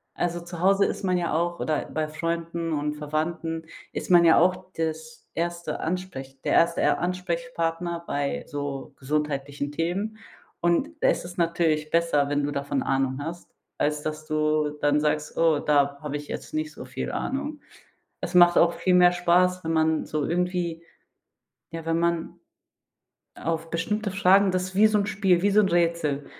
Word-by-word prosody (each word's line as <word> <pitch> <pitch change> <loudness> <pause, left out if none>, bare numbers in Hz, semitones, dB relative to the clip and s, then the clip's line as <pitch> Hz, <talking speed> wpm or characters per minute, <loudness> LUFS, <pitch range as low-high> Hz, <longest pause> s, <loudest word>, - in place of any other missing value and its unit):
Also, 175 0 -1
zu 175 0 -8
Hause 195 +2 +4
ist - - -3
man 185 -1 +2
ja 175 -3 -1
auch 170 +2 0
oder 155 -2 -1
bei 155 -1 -2
Freunden 165 +1 -3
und 150 0 -1
Verwandten 160 +2 -3 0.3
ist - - -4
man 175 -1 +7
ja 165 - +6
auch 180 +1 +1
das 160 +8 -5
erste 170 0 -3
Ansprech 135 -7 -5
der - - 0
erste 170 0 +3
Er - - +2
Ansprechpartner 175 -2 -2
bei 140 -2 -2
so 145 -2 -5
gesundheitlichen 145 0 -2
Themen. 185 +8 -2 0.4
Und 175 - +2
da - - +4
ist - - 0
es 175 0 -9
natürlich 165 -3 +1
besser, 165 -4 +2
wenn 145 0 0
du 145 - -1
davon 140 - -2
Ahnung 135 0 0
hast, 170 +3 -7 0.3
als 150 0 0
dass 155 0 -4
du 155 -1 +1
dann 145 0 +3
sagst: 150 0 -1
„Oh, 160 -3 +3
da 140 -1 +2
hab 150 -2 -5
ich 145 0 -5
jetzt - - -7
nicht 310 0 -2
so - - -9
viel - - -5
Ahnung.“ 290 +2 -3 0.6
Es - - -5
macht 175 -1 +7
auch 170 0 +4
viel 170 +2 +1
mehr 180 0 +6
Spaß, 180 +1 +2
wenn 165 - -1
man 160 -1 +2
so 155 -1 -2
irgendwie 175 -1 -1 0.9
ja, 165 0 -6
wenn 165 0 +1
man 170 -1 -1 1.0
auf 165 0 -3
bestimmte 205 +6 -1
Fragen, 195 0 +4
das 185 0 0
ist 185 - -14
wie 215 +2 +6
so 215 -1 +2
'n 200 - +1
Spiel, 190 -3 +2
wie 205 - +3
so 210 - +5
'n 195 - +1
Rätsel. 165 -5 +1
170 Hz, 175 wpm, -25 LUFS, 150-180 Hz, 1.0 s, man